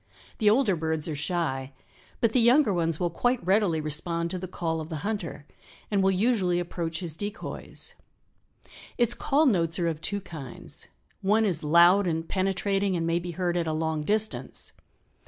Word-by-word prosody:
The 210 - +5
older 220 -3 +3
birds 160 -1 -2
are 155 - -3
shy, 140 -4 -2 0.5
but 230 -3 +3
the 250 - +3
younger 240 -1 +5
ones 165 -2 0
will 175 -1 0
quite 245 +3 0
readily 190 -4 +3
respond 165 +3 -2
to 185 - -3
the 185 - -5
call 165 -2 -2
of 155 - -8
the 155 -1 -5
hunter 170 -9 -4 0.5
and 200 -2 +3
will 190 - +4
usually 190 -3 +2
approach 170 -1 -3
his 165 -4 -5
decoys. 205 +4 -6 1.0
Its 240 -1 +3
call 290 +6 +2
notes 170 - +2
are 175 -2 0
of 160 -2 -2
two 200 +4 -1
kinds. 155 -9 -6 0.3
One 215 +3 +3
is 175 -6 0
loud 175 +5 +6
and 165 -1 -1
penetrating 195 0 0
and 165 - -1
may 165 +1 +1
be 175 +1 -6
heard 175 0 -1
at 170 -2 0
a 160 - 0
long 160 -1 -1
distance. 215 +5 -1
175 Hz, 175 wpm, -27 LUFS, 160-205 Hz, 1.0 s, loud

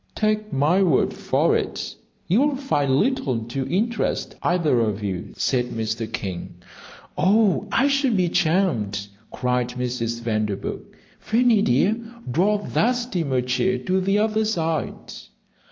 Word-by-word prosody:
"Take 215 0 0
my 150 +8 +2
word 170 -8 +2
for - - +1
it, - - -3 0.3
you 200 +9 +3
will 290 -1 +2
find 145 - 0
little 170 - +1
to 130 +3 -4
interest 220 +5 -1
either 170 -8 +2
of 105 -2 -1
you," 95 -3 -4
said 125 -2 +1
Mr. 110 -1 -3
King. 90 -2 -5 0.6
"Oh, 205 0 +3
I 270 - +3
should 275 -5 +2
be 180 -1 +2
charmed," 155 - 0 0.2
cried 125 -1 -1
Mrs. 120 -2 -3
Vanderburgh. 110 -3 -2 0.4
"Fanny 230 -1 +3
dear, 190 - +2 0.3
draw 190 +10 +3
up 205 - -6
that 245 +3 +3
steamer 175 - -1
chair 125 +10 0
to 190 0 0
the 195 +2 +1
other 215 +1 +1
side." 165 -7 -1
170 Hz, 135 wpm, -23 LUFS, -, 0.6 s, you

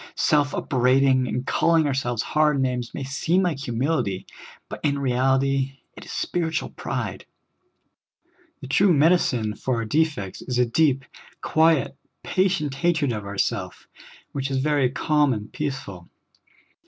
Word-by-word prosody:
Self 145 -1 +2
upbraiding 130 0 +2
and 125 +1 -3
calling 165 +1 +2
our 145 - 0
selves 120 -3 -1
hard 150 -2 +2
names 125 -2 -1
may 140 - -5
seem 160 +7 0
like 170 -6 -1
humility, 120 - -1 0.4
but - - -7
in 145 -2 +1
reality 135 +1 +1 0.2
it - - -11
is - - -9
spiritual 165 -1 -2
pride. - - -5 1.3
The 135 - -7
true 180 +6 +4
medicine 140 -8 +2
for 130 - -2
our 115 -1 -2
defects 145 - -1
is 125 -2 -3
a 125 - +4
deep, 135 +1 +1 0.4
quiet, 160 -4 +2 0.3
patient 185 -7 0
hatred 150 -1 +1
of 100 -2 -5
self, - - -4 0.4
which 135 -1 -3
is 135 - -1
very 140 -1 +2
calm 150 +1 +2
and 105 -2 -7
peaceful. 135 -12 -5
135 Hz, 140 wpm, -24 LUFS, 125-155 Hz, 1.3 s, true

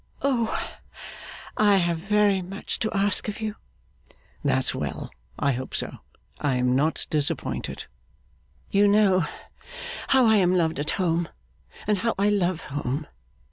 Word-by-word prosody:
'Oh! 245 -5 +2 1.1
I 205 -2 +5
have 170 -2 +1
very 200 +1 +3
much 195 +3 -5
to 220 - -1
ask 200 +2 +2
of 210 - -4
you.' 215 -1 -3 0.9
'That's - - +1
well! - - -4 0.3
I 140 -1 +2
hope 130 0 -4
so; - - -2 0.4
I 140 -3 +1
am 125 0 +2
not 150 +4 +1
disappointed.' 150 -2 -1 0.9
'You 200 +1 +5
know 200 -4 +4 0.8
how 265 -2 +5
I 220 -1 +5
am 185 -2 +3
loved 165 -4 +1
at 145 - -1
home, 170 -2 +1 0.6
and 210 -2 +1
how 230 +4 0
I 200 +1 +3
love 185 -4 +1
home. 145 +1 -3
190 Hz, 140 wpm, -25 LUFS, 160-210 Hz, 1.1 s, I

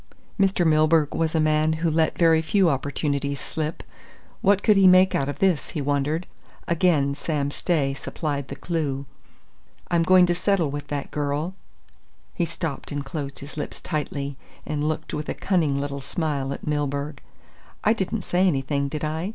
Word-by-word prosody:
Mr. 195 -3 +3
Milburgh 155 -1 +4
was 165 0 0
a - - +3
man 155 0 +3
who 160 +1 0
let 160 0 +1
very 165 -2 +5
few 185 +1 +3
opportunities 140 0 -1
slip. 155 +3 -4 0.6
What 200 0 +3
could 215 - +5
he 195 -1 +6
make 185 +1 +6
out 140 0 0
of 145 - -4
this, 185 -7 +1
he - - 0
wondered? 145 +4 0 0.4
Again 160 -5 +2
Sam 145 -1 -2
Stay 145 -4 0
supplied 140 0 -4
the - - -6
clue. 145 -5 -2 0.9
"I'm 170 -1 +3
going 185 +2 +6
to 175 - +1
settle 175 -4 +1
with 145 0 -5
that 145 0 -4
girl 150 +4 -2 0.4
" - - -36 0.3
He 170 - 0
stopped 160 -3 -5
and 145 -1 -3
closed 140 -1 -5
his 140 +2 -10
lips 150 - -4
tightly, 140 -3 -3 0.3
and 150 0 -1
looked 155 0 -4
with 150 0 -3
a - - -2
cunning 160 -8 +1
little 140 0 -3
smile 140 -1 -2
at - - -6
Milburgh. 145 -1 -2 0.6
"I 215 - +4
didn't 205 0 -2
say 185 +2 +2
anything, 140 -2 0
did 150 +2 -5
I?" 160 +5 -2
155 Hz, 175 wpm, -24 LUFS, 140-170 Hz, 0.9 s, he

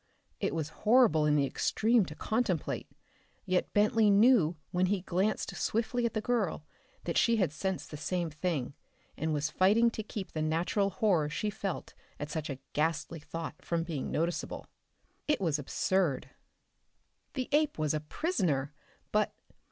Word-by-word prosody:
It - - -1
was 155 -2 -2
horrible 215 -10 +5
in 150 - +4
the 140 -2 +3
extreme 220 - +2
to 150 - -8
contemplate, 215 -7 -1 0.6
yet 180 0 0
Bentley 210 +1 +4
knew 200 -5 +5 0.2
when 180 0 +2
he 195 0 0
glanced 190 +4 -1
swiftly 235 +2 0
at 230 - -7
the 215 - 0
girl 210 -10 -1 0.4
that 170 - +1
she 235 - +4
had 185 -8 +2
sensed 190 +4 -3
the 150 - -6
same 170 +2 -2
thing 150 -4 -2 0.4
and 160 +1 -2
was 150 0 0
fighting 210 +8 +4
to 220 - -4
keep 210 -2 -6
the 155 - -3
natural 170 +6 +1
horror 185 -8 +2
she 210 +7 -2
felt 195 -3 -4 0.3
at 145 0 -5
such 155 0 -3
a 135 - -4 0.2
ghastly 160 +1 -1
thought 165 +2 -7
from 170 -1 -1
being 160 -5 -4
noticeable. 170 +2 -2 0.6
It 300 - +2
was 160 -6 0
absurd. 160 0 0 1.0
The 255 -2 -2
ape 300 0 +2
was 155 -1 0
a 155 - 0
prisoner. 150 - -1 0.4
But.... - - +1
180 Hz, 160 wpm, -31 LUFS, 155-215 Hz, 1.0 s, horrible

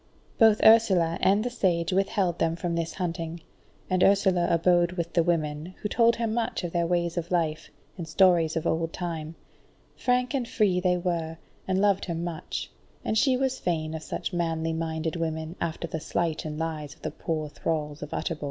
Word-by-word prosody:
Both 220 -2 +6
Ursula 190 -7 +5
and 200 +3 +3
the 245 - -2
Sage 180 -7 0
withheld 190 -2 +1
them 165 0 +1
from 175 0 -3
this 165 -1 -2
hunting, 170 -2 -4 0.5
and 185 -1 +2
Ursula 190 -3 +4
abode 175 +1 +3
with 170 -2 -4
the 170 - +4
women, 160 0 -1
who - - +1
told 235 +1 +4
her 235 - -1
much 225 -1 -1
of 175 - -3
their 170 -1 0
ways 170 0 0
of 170 0 -2
life, 160 -3 -1 0.3
and 165 - -5
stories 170 -2 +4
of 165 - -2
old 165 0 0
time; 165 -2 -5 0.6
frank 250 +1 +1
and 255 -4 -1
free 200 -6 +2
they 180 0 +2
were, 170 -2 -2 0.3
and 190 0 +1
loved 200 -1 +2
her 170 - -3
much, 170 -1 -4 0.3
and 220 - 0
she 255 +3 +3
was 265 0 -1
fain 160 -3 -1
of 160 - -5
such - - -4
manly 165 -2 -1
minded 160 0 -2
women 160 0 -3
after 170 0 -2
the 160 - -4
sleight 165 0 -2
and 150 -1 -4
lies 155 -3 -4
of - - -28
the 155 - -3
poor 155 0 -3
thralls 150 -1 -3
of - - -7
Utterbol. 165 -2 -3
170 Hz, 190 wpm, -27 LUFS, 160-190 Hz, 0.6 s, Both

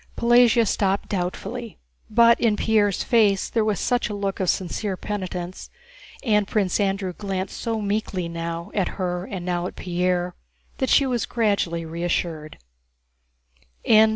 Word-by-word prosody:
Pelagéya 235 -1 +5
stopped 195 0 0
doubtfully, 205 +5 -4 0.3
but 235 +1 +5
in 225 -3 +3
Pierre's 210 -2 +2
face 210 -5 +3
there 225 - +2
was 215 -1 0
such 245 -3 0
a 210 - -4
look 200 -1 -3
of 185 -2 +1
sincere 190 +1 -1
penitence, 185 -3 -5 0.5
and 210 -5 +2
Prince 195 -3 0
Andrew 195 -2 0
glanced 195 0 -4
so 225 -1 -1
meekly 200 -3 -2
now 170 0 -5
at 195 -3 -1
her 180 -1 -2
and 185 -3 -6
now 175 -1 -1
at - - -9
Pierre, 180 0 -1 0.5
that 265 - 0
she 280 - +5
was 245 -3 -1
gradually 200 -7 0
reassured. 165 -2 -3
195 Hz, 140 wpm, -23 LUFS, 180-220 Hz, 0.5 s, Pelagéya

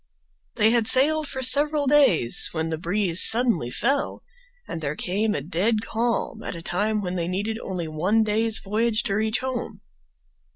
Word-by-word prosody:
They 220 -1 +3
had 230 -2 +1
sailed 305 +5 +3
for 265 -1 -5
several 290 +3 +3
days, 270 - +3
when 160 0 -3
the 160 -1 -4
breeze 180 0 +1
suddenly 225 - +3
fell 270 - -2 0.4
and 165 - -6
there 150 0 -3
came 210 +6 -2
a - - -3
dead 195 +9 -1
calm 230 -1 -3
at - - -6
a 165 - -9
time 210 +4 -1
when 180 0 -4
they 170 -1 -3
needed 205 +5 -3
only 180 -6 -5
one 185 +9 0
day's 220 +1 +1
voyage 220 +3 -1
to 195 - -3
reach 220 +3 -1
home. 260 -2 -5
215 Hz, 170 wpm, -23 LUFS, 180-235 Hz, 0.4 s, They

